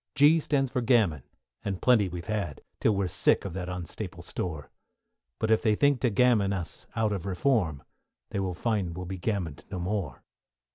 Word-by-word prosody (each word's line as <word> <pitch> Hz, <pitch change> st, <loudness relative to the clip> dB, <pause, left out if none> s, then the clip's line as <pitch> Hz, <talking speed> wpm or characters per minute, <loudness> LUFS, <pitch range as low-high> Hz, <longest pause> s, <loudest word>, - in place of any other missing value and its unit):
=G= 150 Hz, +3 st, +6 dB
stands 135 Hz, -4 st, 0 dB
for 125 Hz, -, 0 dB
Gammon, 110 Hz, -, +3 dB, 0.4 s
and 95 Hz, -2 st, -2 dB
plenty 110 Hz, -7 st, +4 dB
we've 85 Hz, 0 st, -6 dB
had, 100 Hz, -9 st, -3 dB, 0.2 s
Till 110 Hz, -, +3 dB
we 100 Hz, 0 st, +1 dB
are -, -, -1 dB
sick -, -, +2 dB
of 95 Hz, -, -4 dB
that 90 Hz, -1 st, -4 dB
unstaple 90 Hz, -3 st, -6 dB
store; 80 Hz, -5 st, -5 dB, 0.7 s
But 110 Hz, -, 0 dB
if 110 Hz, -, +4 dB
they 110 Hz, -2 st, +3 dB
think 145 Hz, +2 st, +3 dB
to 125 Hz, -, +3 dB
gammon 105 Hz, -3 st, +3 dB
us 95 Hz, -4 st, -6 dB
out 110 Hz, -2 st, +1 dB
of 95 Hz, -2 st, -4 dB
Reform, 95 Hz, -, +1 dB, 0.5 s
They -, -, -1 dB
will 95 Hz, -2 st, -2 dB
find 95 Hz, -4 st, -1 dB
we'll 90 Hz, -, -4 dB
be 95 Hz, +1 st, -5 dB
gammoned 85 Hz, -8 st, -2 dB
no 95 Hz, -, -4 dB
more. 90 Hz, -7 st, -3 dB
100 Hz, 190 wpm, -28 LUFS, 90-115 Hz, 0.7 s, =G=